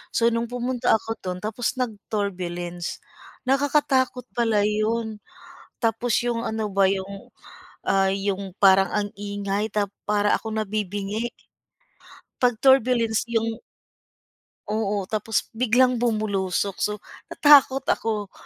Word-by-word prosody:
So, 230 - +4
nung 230 0 -1
pumunta 245 0 -1
ako 225 +1 -5
do'n 180 -1 -4
tapos 225 +4 -2
nag-turbulence. 185 -6 -4 0.5
Nakakatakot 270 -2 +2
pala 225 -4 +2
'yon. 215 +1 -1 0.6
Tapos 230 0 +1
'yung 235 -1 -1
ano 220 -2 -2
ba 195 0 +3
'yung, 195 0 -4 0.5
ah, 195 0 +3
'yung 195 0 -2
parang 195 -1 +5
ang 210 -1 0
ingay 205 +1 -3
tap 205 -2 -1 0.2
para 210 0 +2
akong 220 -1 -3
nabibingi, 205 +2 -3 1.1
'pag 250 -1 +3
turbulence 240 -4 +3
'yung 225 0 -1 1.1
Oo, 210 -2 -1
tapos 220 +2 -1
biglang 250 +1 +2
bumulusok, 200 -4 0
so 210 - +1 0.4
natakot 280 -2 +5
ako. 210 -3 -1
215 Hz, 110 wpm, -24 LUFS, 200-235 Hz, 1.1 s, parang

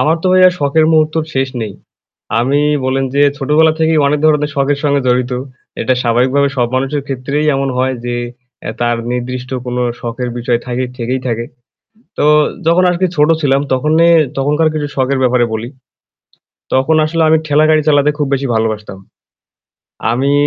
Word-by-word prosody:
আমার 160 +2 +2
তো - - -1
ভাইয়া 185 0 +6
শখের 150 +2 +2
মুহূর্তর 155 0 +2
শেষ 135 0 0
নেই। 105 -2 -5 0.7
আমি 135 +5 +1 0.2
বল্লেন 135 +1 0
যে 140 - +3 0.2
ছোটবেলা 150 +3 +3
থেকেই 160 -1 +2
অনেক 150 +1 +1
ধরনের 150 -1 +2
শখের 140 0 0
সঙ্গে 145 -1 +1
জড়িত। 125 0 +1 0.5
এটা 130 - +1
স্বাভাবিকভাবে 130 +4 +2
সব 120 -2 +2
মানুষের 135 +2 -1
ক্ষেত্রেই 140 +3 -2
এমন 135 0 -1
হয় 130 +1 0
যে 120 0 -2 0.5
এ্যা - - -5
তার 120 0 +1 0.2
নির্দিষ্ট 125 +1 -4 0.2
কোনো 125 0 -2 0.2
শখের 120 +1 -4
বিষয় 120 0 0
থাকে 125 +1 -2
থেকেই 125 +2 -2
থাকে। 115 -1 -2 0.7
তো - - +1 0.4
যখন 170 +2 +4
আজকে 180 +1 0
ছোট 150 +1 +3
ছিলাম 140 -2 +2
তখনে 155 +5 +2 0.3
তখনকার 150 +4 +1
কিছু 150 -1 -2
শখের 135 0 0
ব্যাপারে 125 -1 +2
বলি। 110 +2 -4 1.1
তখন 135 +5 +2
আসলে 165 +1 0
আমি 160 0 +4
ঠেলাগাড়ি 155 +1 +3
চালাতে 145 0 +3
খুব 145 - 0
বেশি 135 0 -2
ভালোবাসতাম। 110 -3 -2 1.1
আমি 135 +4 0
135 Hz, 160 wpm, -14 LUFS, 125-150 Hz, 1.1 s, ভাইয়া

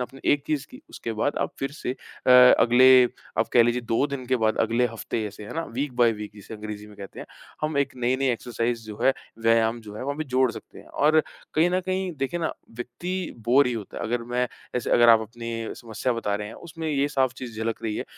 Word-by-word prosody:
आपने 130 +2 -6
एक 145 -1 0
चीज़ 145 -3 -1
की, 260 +2 -12
उसके 115 - -5
बाद 145 - 0
आप - - -1
फिर 135 - -2
से 150 - -4
अ, 130 - -5
अगले 125 +1 +8 0.3
आप - - +2
कह 120 - +7
लीजिए, 120 +1 +1
2 115 +4 +1
दिन 140 -3 -5
के 130 +1 +2
बाद 110 -1 +1
अगले 115 +2 +2
हफ्ते 115 0 -4
जैसे 105 0 -7
है 105 - -8
ना? 165 - -1
वीक 135 +1 -4
बाई 120 -2 +5
वीक 105 -1 -7
जिसे 105 +2 -10
अंग्रेज़ी 105 -1 -7
में 105 - -15
कहते 100 -1 -9
हैं, - - -8 0.3
हम 155 -1 -1
एक 140 -1 0
नए-नए 130 +2 +1
एक्सरसाइज़ 120 0 -2
जो 105 -1 -8
है, 135 - +5 0.3
व्यायाम 115 0 +3
जो 105 -2 -11
हैं - - -5
वहाँ 140 +2 -3
भी 155 - -3
जोड़ 130 -1 +2
सकते - - -11
हैं - - -14
और 155 +2 +3 0.3
कहीं 165 +3 +4
न 185 +1 +1
कहीं 185 -1 -1
देखिए 135 +6 -2
ना, 160 - -1 0.2
व्यक्ति 170 +11 -5
बोर 130 +3 +5
ही 125 - 0
होता 110 -5 -6
है। - - -5
अगर 120 +1 -1
मैं 125 0 +2 0.3
जैसे 125 - -2
अगर 120 0 +6
आप 115 -1 +8
अपनी 115 +1 -7 0.2
समस्या 120 +2 -3
बता 110 -3 -2
रहे 105 0 -3
हैं, - - -10
उसमें 165 -1 -7
ये 145 -1 +1
साफ 130 -3 +1
चीज़ 120 -4 -8
झलक 115 0 -2
रही 110 -2 -2
है, - - -3
125 Hz, 240 wpm, -25 LUFS, 115-140 Hz, 0.3 s, अगले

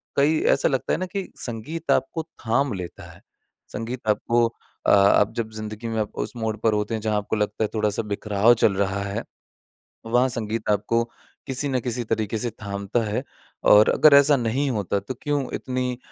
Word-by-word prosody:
कई 150 +3 +3
ऐसा 135 - +2
लगता 135 -2 -1
है - - 0
ना 185 - -1
कि 190 +1 -5
संगीत 130 +8 -4
आपको 160 +4 0
थाम 135 -3 -1
लेता 90 -3 -7
है, - - -17 0.5
संगीत 115 +2 -5
आपको 115 +3 +2 0.4
अ, - - +4
आप 100 +1 +5
जब 115 -2 -2
ज़िंदगी 110 +1 -6
में 110 -1 -1
उस 105 - -4
मोड़ 110 -1 -2
पर 110 - +3
होते 105 +2 -1
हैं 110 - -2
जहाँ 105 -1 0
आपको 105 +1 -2
लगता 105 +1 -1
है - - +1
थोड़ा-सा 105 0 0
बिखराव 105 +3 +3
चल 100 - +5
रहा 100 0 0
है 100 +3 -3 0.8
वहाँ 120 +3 +2
संगीत 115 -2 -3
आपको 110 +3 +1 0.4
किसी 135 +2 +1
न 130 -1 +1
किसी 120 0 -2
तरीक़े 110 -1 -1
से 120 +2 -1
थामता 100 +2 -2
है 105 -1 -2 0.5
और 105 +1 +7
अगर 155 -2 +6
ऐसा 140 +1 +6
नहीं 125 +4 0
होता 100 -3 -1
तो 100 +6 -6
क्यों 145 -1 0
इतनी 125 -1 -2
115 Hz, 185 wpm, -24 LUFS, 105-130 Hz, 0.8 s, और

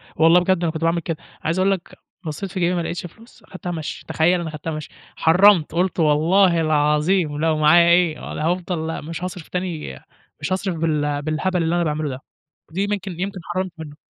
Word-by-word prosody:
والله 165 +3 +6
بجد 180 0 +1
أنا 165 - +1
كنت 160 - -6
باعمل 165 +1 +2
كده، 165 -1 -4 0.3
عايز 170 +3 0
أقول 190 +1 +3
لك 190 -3 -4 0.3
بصّيت 170 +5 -5
في 190 - -4
جيبي 175 +1 +1
ما 175 - 0
لقيتش 170 +1 -4
فلوس، 225 +6 -15
أخدتها 185 -3 -7
مشي، 160 -3 -6
تخيل 175 +2 +2
أنا 165 - -4
خدتها 155 +1 -5
مشي، 155 -1 -6 0.3
حرَّمت، 180 0 +5
قُلت 180 +1 0
والله 165 +3 +4
العظيم 150 +1 +2
لو 160 -1 +2
معايا 170 +3 +6
إيه 170 -3 +3
ول - - -5
هافضل 165 -1 -2
مش 165 +2 -6
هاصرف 180 -2 -6
تاني 175 - -4 0.4
مش 185 - -1
هاصرف 190 -1 -2
بال 150 -3 0
بالهبل 165 +4 -1
اللي 165 +1 +1
أنا 175 - +2
باعمله 155 -1 -1
ده، 130 0 -6 0.5
دي 195 +5 -1
ممكن 195 -4 -4
يمكن 195 +1 -3
حرَّمت 185 +2 -3
منه. 155 -2 -9
170 Hz, 195 wpm, -21 LUFS, 155-185 Hz, 0.5 s, والله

